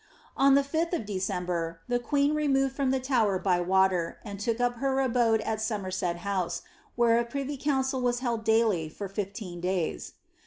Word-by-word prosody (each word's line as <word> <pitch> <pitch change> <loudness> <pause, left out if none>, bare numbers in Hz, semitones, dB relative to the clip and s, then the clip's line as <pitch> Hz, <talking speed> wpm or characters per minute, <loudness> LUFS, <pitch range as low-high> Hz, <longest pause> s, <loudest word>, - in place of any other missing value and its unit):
On 275 0 +5
the 280 - +4
5th 325 +5 -1
o( - - +1
De 205 -6 -4
cember, 180 -3 -2
the 245 0 +1
queen 285 +4 +1
removed 270 -3 +1
from 275 -2 0
the 265 0 +1
Tower 240 -7 +1
by 180 -1 +1
water, 185 -2 +2
and 200 -2 -7
took 230 +2 -1
up 245 0 +1
her 270 +2 0
abode 235 -4 +2
at 220 0 -2
Somerset 190 -5 -2
House, 190 -3 -1 0.3
where 235 -1 +4
a - - +1
privy 280 +4 -4
council 265 -1 0
was 245 -1 +1
held 240 -3 -2
daily 220 -8 +2
for 200 +5 -6
fifteen 195 -2 -5
days. 180 - -2
230 Hz, 185 wpm, -28 LUFS, 190-265 Hz, 0.3 s, On